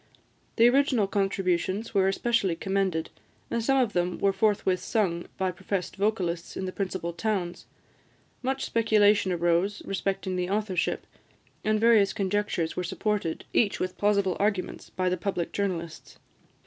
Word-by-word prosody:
The 230 - +6
original 255 -4 +3
contributions 195 +1 -1
were 195 -2 +3
especially 195 -2 +1
commended, 190 -3 -1 0.4
and 235 -1 0
some 270 +3 +3
of 245 -5 +2
them 175 0 0
were 195 -1 +2
forthwith 195 -3 +1
sung 180 -7 -1
by 190 -1 0
professed 190 0 -4
vocalists 185 -4 -1
in 190 - -3
the 185 - -3
principal 185 -3 -3
towns. 180 -2 -2 0.7
Much 265 +1 -1
speculation 210 -4 +3
arose 175 +3 +1
respecting 195 -1 -2
the 180 0 -1
authorship, 200 -3 -1 0.6
and 215 0 +2
various 215 -4 +5
conjectures 195 -4 -1
were 180 - -2
supported, 200 -1 -2
each 210 -4 +2
with 185 0 -3
plausible 200 -3 +2
arguments, 200 -2 -1
by 185 0 -2
the 180 0 +1
public 180 -2 -2
journalists. 170 -5 -4
195 Hz, 140 wpm, -27 LUFS, 180-210 Hz, 0.7 s, The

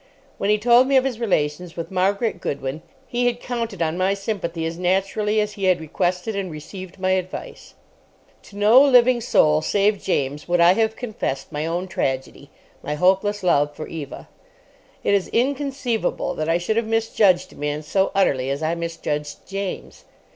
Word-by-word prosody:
When 200 - 0
he 210 - +4
told 240 +4 +5
me 275 0 +4
of 260 - +4
his 255 -4 -3
relations 175 -5 -1
with 165 +3 -5
Margaret 200 +4 0
Goodwin 140 +2 -4 0.3
he 245 0 0
had 240 0 -1
counted 230 -8 -3
on 165 +2 -2
my 190 +2 +2
sympathy 185 -5 -3
as 165 +1 -4
naturally 195 +4 +1
as 210 0 0
he 200 -1 -3
had 185 -2 +3
requested 180 +6 -2
and 195 -2 -3
received 180 +4 -9
my 185 0 +1
advice. 185 -1 -4 0.7
To 200 - -15
no 215 +5 +7
living 250 -3 +5
soul, 155 -9 +3
save 205 +4 +1
James, 145 -4 -2
would 175 0 +1
I 170 +1 +7
have 220 +2 +1
confessed 215 - -4
my 150 +2 -3
own 175 +3 -2
tragedy—my 140 0 -5
hopeless 190 +5 +2
love 145 -4 +2
for 155 - -6
Eva. 150 -5 -8 0.8
It - - +2
is 200 -2 +2
inconceivable 270 -2 -1
that 155 +1 -3
I 165 - +3
should 175 +6 -1
have 230 -1 0
misjudged 210 -5 +2
a - - -16
man 150 +1 -3
so 190 +6 +1
utterly 135 -9 +2
as 140 +3 -2
I 160 +1 +1
misjudged 165 -3 -4
James. 195 -1 -6
185 Hz, 175 wpm, -22 LUFS, 160-220 Hz, 0.8 s, no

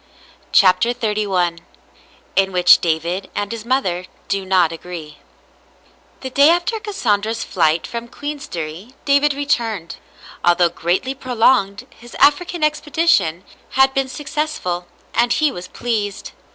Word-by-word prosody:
CHAPTER 215 +5 +4
XXXI 200 -7 0 0.8
IN 195 0 +3
WHICH 180 -1 +6
DAVID 170 +3 -1
AND 205 0 -2
HIS 230 -1 -6
MOTHER 185 -9 0 0.2
DO 195 -1 -1
NOT 185 -3 +3
AGREE 165 -3 -9 1.0
The 260 - -6
day 280 +3 +6
after 350 +7 +1
Cassandra's 225 - -1
flight 160 -3 +1
from 235 0 -6
Queensderry 235 - -7
David 280 0 +3
returned. 230 -11 -2 0.5
Although 175 0 +4
greatly 175 +10 -1
prolonged, 245 -6 +1
his 240 +1 -14
African 335 +3 +2
expedition 295 - +1 0.3
had 265 0 +5
been 270 -1 0
successful, 280 - -3 0.3
and 235 +1 +2
he 305 -2 +2
was 180 -5 -8
pleased. 210 -4 -3
220 Hz, 120 wpm, -19 LUFS, 180-275 Hz, 1.0 s, WHICH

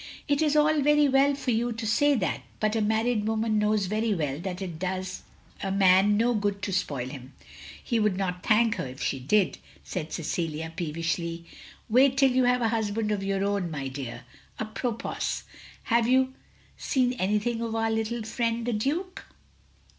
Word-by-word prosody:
" - - -22
It 285 +1 +2
is 305 -1 +2
all 300 0 +4
very 295 +1 +4
well 275 +1 +4
for 275 -2 -2
you 235 +1 0
to 225 0 -5
say 290 +6 +3
that, 205 -7 -1 0.2
but 215 0 +1
a 225 - +1
married 220 +1 +1
woman 220 -1 +1
knows 210 -1 +2
very 215 +2 0
well 145 -4 -2
that 180 +1 -5
it 175 -5 -6
does 185 0 -3 0.4
a 195 - -2
man 195 +1 +5
no 240 +2 +3
good 205 -2 -1
to 195 - -2
spoil 140 -9 -1
him; 130 -1 -10 0.5
he 235 -3 0
would 210 -3 +1
not 180 -2 -2
thank 225 +2 +3
her - - -3
if 130 +2 -10
she 135 - -1
did," 190 +10 +1 0.2
said 160 -3 -5
Cecilia 160 -1 -3
peevishly. 165 0 -3 0.4
"Wait 260 +4 +4
till 270 -1 +5
you 255 0 +3
have 250 0 +2
a 225 - +2
htisband 220 -1 -1
of 200 - -2
your 195 0 -1
own, 200 -3 -1
my 140 -4 -4
dear. 125 -3 -7 0.3
A 220 - -2
propos, 230 +1 -3 0.4
have 230 -1 +2
you 260 +1 +3 0.4
seen 255 -2 +1
anything 210 +4 0
of 230 -1 -3
our 225 0 +1
little 225 +1 -1
friend, 230 +1 -1
the 245 - 0
Duke?" 340 - -2
215 Hz, 185 wpm, -27 LUFS, 185-240 Hz, 0.5 s, man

